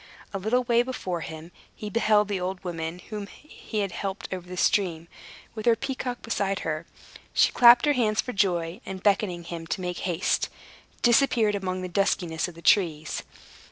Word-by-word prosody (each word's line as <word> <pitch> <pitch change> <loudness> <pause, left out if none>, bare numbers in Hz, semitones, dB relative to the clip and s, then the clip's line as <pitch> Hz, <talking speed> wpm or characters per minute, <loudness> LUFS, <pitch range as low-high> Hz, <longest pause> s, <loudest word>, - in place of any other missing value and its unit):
A 195 - -2
little 230 +6 +1
way 240 -1 +3
before 190 -9 -3
him, 160 +2 -8 0.2
he 210 - -7
beheld 210 -1 +3
the 200 -2 -2
old 185 +1 -4
woman 165 -1 -4
whom 210 -2 -4
he 220 -4 -6
had 195 -2 -2
helped 195 0 -4
over 180 -1 -7
the 180 - -6
stream, 170 -4 +1 0.5
with 220 0 -5
her 230 - +6
peacock 260 -1 -4
beside 195 -3 -1
her. 155 +1 -3 0.5
She - - +5
clapped 240 +1 +7
her 295 - +4
hands 220 -5 +1
for 250 - -1
joy, 180 -1 0
and 190 -1 -7
beckoning 195 -4 +1
him 165 -1 -7
to 165 - -2
make 180 -1 -3
haste, 180 -1 0 0.5
disappeared 235 -3 +4
among 185 -2 -2
the - - -3
duskiness 175 -3 0
of 175 - -10
the 170 - -13
trees. 160 -6 +2
195 Hz, 180 wpm, -26 LUFS, 175-220 Hz, 0.5 s, clapped